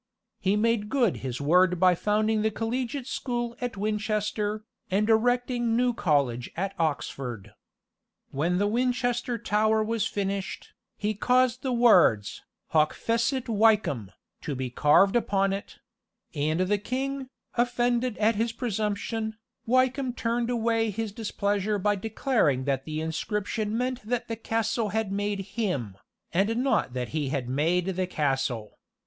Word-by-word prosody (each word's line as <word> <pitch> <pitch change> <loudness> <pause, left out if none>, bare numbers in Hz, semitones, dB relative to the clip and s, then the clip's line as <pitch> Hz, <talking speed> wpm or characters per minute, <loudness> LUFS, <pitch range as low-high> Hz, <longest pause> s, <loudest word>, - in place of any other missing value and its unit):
He 195 0 +1
made 215 -1 +1
good 245 -7 +2
his 125 -2 -4
word 180 +4 +3
by 185 0 +6
founding 215 +4 +1
the 220 - +2
collegiate 245 +4 -3
school 240 -2 -3
at 245 -4 -3
Winchester, 210 0 -1 0.3
and 205 +3 +1
erecting 240 +1 +2
New 250 0 +2
College 140 - 0
at 195 +2 -2
Oxford. 125 - -3 0.8
When 165 +6 0
the 200 - +2
Winchester 245 +2 0
Tower 215 0 +2
was 220 -1 0
finished, 200 -1 -4 0.2
he 210 +1 -1
caused 250 +3 +2
the 260 - -2
words, 185 - +4 0.3
HOC 155 -1 +3
FECIT 235 +3 0
WYKEHAM, 210 - +2 0.3
to 150 -5 -4
be 130 -1 -4
carved 150 - +4
upon 195 -4 +2
it; 195 - -6 0.6
and 155 +3 0
the 200 +2 +1
king, 265 +4 -3 0.2
offended 245 0 +1
at 220 +2 +3
his 225 +2 0
presumption, 220 -1 -2 0.3
Wykeham 255 +1 +2
turned 235 0 -1
away 230 -2 +1
his 215 +1 -3
displeasure 205 -1 -1
by 205 +1 +1
declaring 205 - +1
that 135 -1 -1
the 155 0 -3
inscription 210 +6 -2
meant 255 +1 -1
that 235 +3 -2
the 230 - -3
castle 225 0 -1
had 220 -1 -1
made 205 0 -1
him, 185 - -3 0.4
and 205 +6 +2
not 260 - +1
that 125 -1 -3
he 150 -3 -2
had 135 -3 -2
made 165 +7 +1
the 185 0 -1
castle. 135 - -2
210 Hz, 140 wpm, -27 LUFS, 180-235 Hz, 0.8 s, by